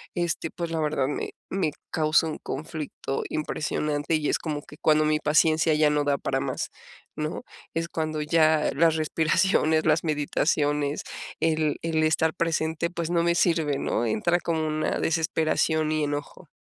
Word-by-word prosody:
este, 170 -2 -1
pues, 170 -1 -4
la 165 - -1
verdad, 150 -3 0
me 145 - -3 0.2
me 185 -5 0 0.2
causa 155 0 +3
un 155 - -5
conflicto 150 -2 -4
impresionante, 150 0 -1
y 155 -2 0
es - - +1
como 150 -3 -4
que 150 - -14
cuando 155 -1 +3
mi 155 0 +2
paciencia 155 +1 +3
ya 150 0 +4
no 150 0 +1
da 140 -1 +2
para - - -1
más, - - -3 0.4
¿no?, 155 +1 -4 0.3
es 165 +1 -1
cuando 155 -2 -2
ya 155 0 +3
las 160 +2 +3
respiraciones, 160 +1 +2
las 155 0 +3
meditaciones, 145 -1 0 0.4
el 155 -2 +1
el 160 -1 0
estar 160 0 +2
presente, 165 -1 0
pues, 170 -1 -4
no 170 - +3
me 170 0 +2
sirve, 160 -6 +2
¿no?, 120 - 0
entra 170 +10 +1
como 160 -2 -1
una 155 0 -1
desesperación 160 -1 +1
y 155 -1 +1
enojo. 145 0 -5
155 Hz, 160 wpm, -26 LUFS, 150-165 Hz, 0.4 s, ya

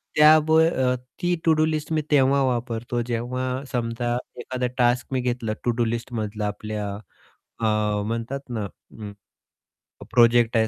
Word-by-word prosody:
त्या 155 +1 +8
ब 160 0 +4
अ, 130 -6 +2 0.3
ती 175 0 +2
टू-डू 155 -1 +4
लिस्ट 155 0 -2
मी 155 - +2
तेव्हा 140 -1 +4
वापरतो, 120 -1 -1
जेव्हा 125 +3 -3
समजा 120 0 -1 0.2
एखादा 125 0 -2
टास्क 120 0 +2
मी 130 - +1
घेतला 120 -3 -2
टू-डू 120 -1 +1
लिस्टमधला. 110 -2 -3
आपल्या 105 0 -4 0.7
अ, 105 -2 +1
म्हणतात 115 +5 -3
ना, 110 -4 -3 0.3
हं, 105 -1 -6 1.0
प्रोजेक्ट 120 0 +4
आहे 110 0 +3
120 Hz, 135 wpm, -24 LUFS, 115-130 Hz, 1.0 s, त्या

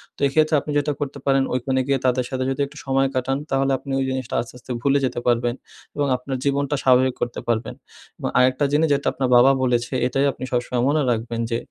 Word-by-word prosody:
তো - - -20
এক্ষেত্রে, 155 +3 +2
আপনি 150 - -6
যেটা 145 +1 +1
করতে 140 -1 -4
পারেন, 135 -1 +3
ঐখানে 130 +1 0
গিয়ে 135 -2 +1
তাদের 125 0 +2
সাথে 130 -1 -2
যদি 135 +2 -2
একটু 145 +2 -15
সময় 135 0 +2
কাটান, 130 +1 0
তাহলে 135 0 +1
আপনি 140 - -8
ওই 135 - 0
জিনিসটা 130 -2 -3
আস্তে, 115 - -10
আস্তে 125 - -10
ভুলে 140 +1 +3
যেতে 125 - -2
পারবেন 120 0 +1 0.4
এবং 145 -1 0
আপনার 130 +1 -5
জীবনটা 140 +1 0
স্বাভাবিক 130 0 +4
করতে 120 - -2
পারবেন 115 -1 -1 0.5
এবং - - -2
আরেকটা 130 +3 +3
জিনিস 155 +2 +3
যেটা 140 - -1
আপনার 130 -2 -1
বাবা 125 +3 +7
বলেছে, 120 0 0
এটাই 135 +2 +1
আপনি - - -10
সবসময় 120 0 0
মনে 150 +1 +2
রাখবেন 115 0 -2
যে, 115 - +1
130 Hz, 215 wpm, -22 LUFS, 125-140 Hz, 0.5 s, বাবা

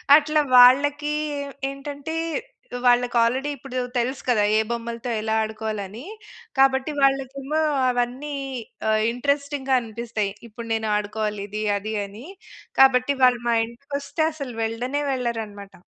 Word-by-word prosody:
అట్లా 305 0 +3
వాళ్ళకి 285 +4 +6 0.6
ఏంటంటే 285 +3 -6 0.7
వాళ్ళకి 245 0 +3
ఆల్రెడీ 260 +5 0
ఇప్పుడు 255 -1 -5 0.2
తెలుసు 255 +3 -1
కదా! 215 -4 +3
ఏ - - +4
బొమ్మలతో 235 +1 -4
ఎలా 220 0 -1
ఆడుకోవాలని. 220 +1 -5 0.5
కాబట్టి 270 +2 +3
వాళ్ళకేమో 275 +2 +1 0.3
అవన్నీ 250 +4 -2 0.6
ఆహ్, 215 0 +3
ఇంట‌రెస్టింగ్‌గా 280 +1 0
అనిపిస్తాయి. 220 -2 -3 0.2
ఇప్పుడు 230 +1 -9
నేను 220 -1 -1
ఆడుకోవాలి, 210 0 -3
ఇది, 215 +1 -3
అది, 215 +2 -5
అని. 205 +6 -11 0.5
కాబట్టి 265 +1 +5
వాళ్ళు 245 -2 +5
మా 235 - +3
ఇంటికి 235 +5 -16
వస్తే 315 +3 -2
అసలు 275 -6 -7
వెళ్ళనే 245 +6 -2
వెళ్ళరన్నమాట. 225 -6 -4
245 Hz, 120 wpm, -23 LUFS, 220-275 Hz, 0.7 s, వాళ్ళకి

